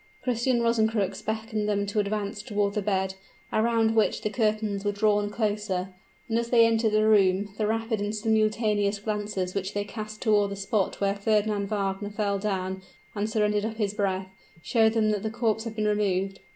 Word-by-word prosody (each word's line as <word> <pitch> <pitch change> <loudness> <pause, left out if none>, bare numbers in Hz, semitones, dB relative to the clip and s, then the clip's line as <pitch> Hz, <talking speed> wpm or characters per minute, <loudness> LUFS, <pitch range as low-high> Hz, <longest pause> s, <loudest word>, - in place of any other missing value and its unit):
Christian 240 0 +1
Rosencrux 220 -4 +1
beckoned 220 -1 -2
them 200 -1 +1
to 205 +1 -1
advance 205 0 -2
toward 205 -3 -1
the 210 - -1
bed, 190 -1 0 0.4
around 225 0 +2
which 220 - +2
the 215 - -1
curtains 215 -3 0
were 205 - +1
drawn 205 0 +1
closer; 205 -4 -1 0.4
and 230 0 +1
as 235 0 -3
they 235 -2 +6
entered 225 -1 +2
the 215 0 +3
room, 200 -1 +3
the 215 - +1
rapid 225 0 -1
and 205 +1 -2
simultaneous 215 -1 +1
glances 205 -3 -3
which 195 0 -3
they 205 - 0
cast 215 0 -7
toward 210 -3 +3
the 200 - -4
spot 195 0 -1
where 200 0 +2
Fernand 205 0 0
Wagner 200 -1 -2
fell 205 -1 -1
down 190 -2 -2 0.3
and 210 +1 -2
surrendered 210 -1 +1
up 220 0 -3
his 205 -3 -1
breath, 190 -2 -1 0.3
showed 225 -3 +3
them 215 -2 +2
that 210 -2 -1
the 220 - -2
corpse 225 -1 -1
had 225 -1 -5
been 215 -1 -1
removed. 195 -2 0
210 Hz, 185 wpm, -27 LUFS, 200-220 Hz, 0.4 s, they